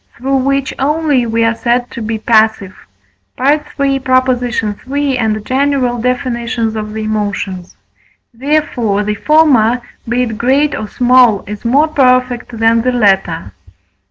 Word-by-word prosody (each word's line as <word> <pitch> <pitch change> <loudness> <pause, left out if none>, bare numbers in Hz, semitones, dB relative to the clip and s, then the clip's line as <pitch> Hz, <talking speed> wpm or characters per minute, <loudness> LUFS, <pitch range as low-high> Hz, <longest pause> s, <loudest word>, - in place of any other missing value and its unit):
through 270 +2 0
which 275 +1 -1
only 290 -3 +1
we 230 0 0
are 225 0 +2
said 240 +1 -1
to 235 - -7
be 220 0 -3
passive 220 -4 +1 0.6
(III. 285 +4 +2 0.2
iii. 255 -1 0
and 215 -2 -1
general 260 -2 0
Def. 250 +1 -1
of 250 - -2 0.6
the 220 - -4
Emotions); 205 -4 -4 0.6
therefore, 240 -6 -1
the 210 +1 -1
former, 250 -2 +3 0.3
be 245 +1 +1
it 225 -3 -5
great 275 +5 +2
or 215 - -4
small, 245 -3 +3
is 210 +1 -8
more 275 +6 +3
perfect 255 -4 +1
than 225 +1 +3
the 255 +2 0
latter. 195 - 0
245 Hz, 130 wpm, -14 LUFS, 220-270 Hz, 0.6 s, former